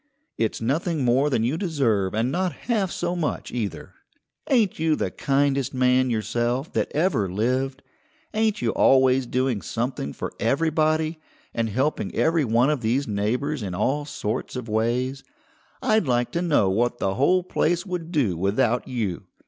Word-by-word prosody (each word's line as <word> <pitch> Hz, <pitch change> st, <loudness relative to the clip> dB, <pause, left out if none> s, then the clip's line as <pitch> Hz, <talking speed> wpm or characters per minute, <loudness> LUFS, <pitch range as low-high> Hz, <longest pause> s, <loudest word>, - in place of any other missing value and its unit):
It's 110 Hz, -2 st, -1 dB
nothing 145 Hz, +4 st, 0 dB
more 130 Hz, +5 st, +3 dB
than 115 Hz, -5 st, +1 dB
you 130 Hz, +7 st, 0 dB
deserve 120 Hz, -, 0 dB
and 115 Hz, +4 st, +1 dB
not 180 Hz, +3 st, 0 dB
half 215 Hz, -6 st, +1 dB
so 175 Hz, 0 st, -2 dB
much 165 Hz, -4 st, -3 dB
either. 110 Hz, -6 st, -4 dB, 0.6 s
Ain't 225 Hz, -, +2 dB
you 160 Hz, -1 st, +2 dB
the -, -, -2 dB
kindest 140 Hz, -2 st, 0 dB
man 130 Hz, 0 st, +3 dB
yourself 120 Hz, +4 st, -1 dB
that -, -, -1 dB
ever 145 Hz, -, +1 dB
lived? 130 Hz, +7 st, -1 dB, 0.5 s
Ain't 215 Hz, -, +1 dB
you 115 Hz, -, +2 dB
always 130 Hz, -1 st, +4 dB
doing 125 Hz, -4 st, 0 dB
something 115 Hz, -, -3 dB
for -, -, -6 dB
everybody, 155 Hz, +5 st, +1 dB, 0.3 s
and 115 Hz, -1 st, -1 dB
helping 130 Hz, +8 st, -1 dB
every 160 Hz, -1 st, +2 dB
one 120 Hz, +5 st, +3 dB
of 145 Hz, -5 st, -1 dB
these 125 Hz, +5 st, 0 dB
neighbours 120 Hz, +8 st, -1 dB
in 95 Hz, -4 st, -4 dB
all 145 Hz, +10 st, 0 dB
sorts 115 Hz, -4 st, -4 dB
of 125 Hz, -2 st, -5 dB
ways? 120 Hz, +5 st, -1 dB, 0.6 s
I'd 215 Hz, -7 st, +2 dB
like 120 Hz, -1 st, +1 dB
to 170 Hz, -, -1 dB
know 155 Hz, -, +3 dB
what 120 Hz, +4 st, +1 dB
the 95 Hz, -4 st, -1 dB
whole 180 Hz, -, +3 dB
place 175 Hz, 0 st, 0 dB
would 175 Hz, -3 st, -5 dB
do 130 Hz, -, +1 dB
without 105 Hz, +7 st, +1 dB
you! 110 Hz, -8 st, -3 dB
130 Hz, 160 wpm, -24 LUFS, 115-155 Hz, 0.6 s, always